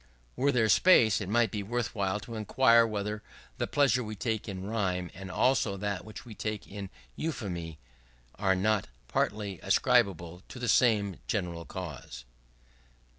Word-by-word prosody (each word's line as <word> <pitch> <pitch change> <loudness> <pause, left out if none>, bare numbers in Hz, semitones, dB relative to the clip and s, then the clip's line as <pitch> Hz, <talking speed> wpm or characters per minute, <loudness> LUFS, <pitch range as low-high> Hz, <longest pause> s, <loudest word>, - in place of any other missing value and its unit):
Were 140 +3 +2
there 115 -4 +2
space, 110 - +5
it 95 - -4
might 120 +1 +2
be 105 - -3
worthwhile 105 -3 -2
to 115 - -9
inquire 115 +2 +4
whether 105 0 -3 0.4
the - - 0
pleasure 130 -4 +2
we 110 -1 -6
take 110 0 -2
in 95 -1 -5
rhyme, 90 -6 -1
and 95 +1 -9
also 105 -2 +2
that 100 -2 -3
which 110 +2 -10
we 115 - -9
take 105 0 -4
in 100 -1 -7 0.3
euphony, 90 - -4 0.6
axe 95 -2 +2
not 105 0 +1 0.2
partly 100 - -1
ascribable 95 -6 +2
to - - -9
the 125 -1 -3
same 105 -5 +3
general 85 -5 -2
cause. 75 -10 -8
105 Hz, 150 wpm, -29 LUFS, 95-115 Hz, 0.6 s, space